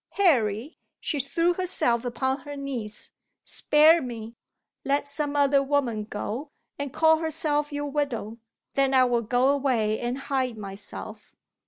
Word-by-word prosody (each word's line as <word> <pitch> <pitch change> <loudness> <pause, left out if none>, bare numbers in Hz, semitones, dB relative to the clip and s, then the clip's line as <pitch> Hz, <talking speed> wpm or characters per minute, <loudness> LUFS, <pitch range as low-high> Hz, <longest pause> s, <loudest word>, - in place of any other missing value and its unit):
"Harry" 255 - +2 0.2
she 300 -3 -2
threw 335 +6 +1
herself 340 -10 +1
upon 260 +2 -1
her 290 +2 -8
knees 255 -7 -4 0.3
"spare 315 +3 +5
me! 230 -3 -6 0.5
Let 280 +1 +1
some 290 0 -3
other 280 -1 +4
woman 265 -6 0
go, 220 +7 -5 0.3
and 285 -2 -3
call 320 +2 +4
herself 305 -2 0
your 290 0 -3
widow. 260 -6 -3 0.3
Then 270 -1 +2
I 260 - +7
will 245 -2 +2
go 245 +4 +2
away 250 -7 +1
and 240 +1 -2
hide 265 -4 -2
myself." 200 -1 -9
275 Hz, 140 wpm, -26 LUFS, 235-290 Hz, 0.5 s, I